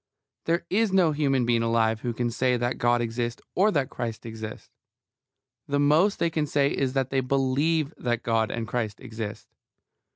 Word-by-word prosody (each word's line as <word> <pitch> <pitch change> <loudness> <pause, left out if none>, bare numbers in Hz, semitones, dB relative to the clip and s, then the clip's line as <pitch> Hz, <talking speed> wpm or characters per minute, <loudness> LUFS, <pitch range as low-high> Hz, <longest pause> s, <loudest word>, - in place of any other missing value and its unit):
There 170 +1 0
is 215 +1 +2
no 185 -4 +4
human 135 -4 +1
being 120 -1 +2
alive 115 -1 +1
who 120 - -2
can 120 +1 -2
say 125 +1 +1
that 120 +1 -2
God 120 0 +3
exists 120 0 -2
or 200 +4 +4
that 145 -10 0
Christ 115 -2 -5
exists. 110 -1 -8 1.0
The 145 0 0
most 155 +8 +4
they 170 - 0
can 155 -2 -1
say 140 -1 +2
is 130 -2 -1
that 135 -2 -1
they 135 -1 +2
believe 140 +4 +1
that 120 -2 -1
God 115 -2 +1
and 115 -1 -3
Christ 110 -3 -3
exist. 110 -4 -7
125 Hz, 175 wpm, -26 LUFS, 115-145 Hz, 1.0 s, no